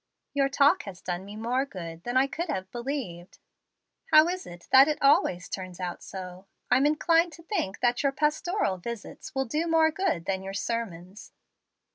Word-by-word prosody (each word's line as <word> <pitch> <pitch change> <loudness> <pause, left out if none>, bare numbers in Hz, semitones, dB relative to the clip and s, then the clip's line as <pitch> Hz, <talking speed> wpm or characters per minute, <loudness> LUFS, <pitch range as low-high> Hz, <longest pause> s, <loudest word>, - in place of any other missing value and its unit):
Your 275 -1 +2
talk 285 +5 +4
has 190 -3 -8
done 180 +1 -4
me 205 +1 -9
more 240 +4 0
good 170 -10 -8
than 245 +1 0
I 265 - +5
could 330 +5 -4
have 190 -9 -3
believed. 235 -9 -5 0.7
How 310 +1 +8
is 370 +1 -4
it 175 0 -12
that 265 +2 +8
it 305 - -1
always 275 - +3
turns 185 -2 -6
out 180 -1 -4
so? 185 0 -9 0.2
I'm 260 +3 +5
inclined 330 +2 +2
to 335 - -13
think 220 - -3
that 245 0 +2
your 280 -2 +2
pastoral 300 - 0
visits 235 - -8
will 265 0 +1
do 305 +8 -1
more 320 -1 +4
good 325 - -1
than 190 -1 -1
your 195 0 -6
sermons." 195 -4 -5
245 Hz, 180 wpm, -27 LUFS, 185-300 Hz, 0.7 s, How